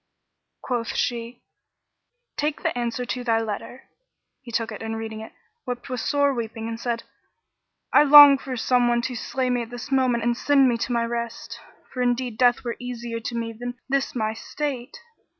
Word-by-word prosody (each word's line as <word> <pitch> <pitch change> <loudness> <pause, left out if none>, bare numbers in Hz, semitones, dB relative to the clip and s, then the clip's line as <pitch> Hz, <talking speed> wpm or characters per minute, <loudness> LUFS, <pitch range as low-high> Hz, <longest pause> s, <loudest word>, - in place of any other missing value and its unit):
Quoth 240 -3 -2
she, 235 0 -3 0.9
"Take 295 0 -2
the - - 0
answer 240 0 -2
to 250 0 -4
thy 225 -2 +2
letter." 225 +3 -5 0.6
He 250 -3 -11
took 230 -1 -1
it - - -8
and 225 0 -4
reading 220 -1 -6
it, 220 - -9 0.4
wept 245 +1 -5
with 255 -1 -3
sore 285 +3 +2
weeping 225 -2 -4
and 230 0 -5
said, 235 -1 -2 0.9
"I - - +8
long 290 -1 +10
for 260 -2 -5
some 245 +1 +2
one 240 0 +1
to 250 +1 -3
slay 255 +2 -2
me 245 -1 +1
at 230 - -6
this 245 +3 -8
moment 255 -3 +2
and 240 0 +1
send 275 +1 +4
me 235 -2 +1
to 240 - -2
my 235 -1 +1
rest, 235 0 -5 0.3
for 255 - -3
indeed 245 -2 -1
death 245 0 +4
were 235 -2 -4
easier 240 -2 -5
to 235 +1 -5
me 230 -1 -3
than 245 +2 -6
this 275 0 0
my 220 -2 -1
state!" 275 - -5
240 Hz, 185 wpm, -24 LUFS, 230-255 Hz, 0.9 s, long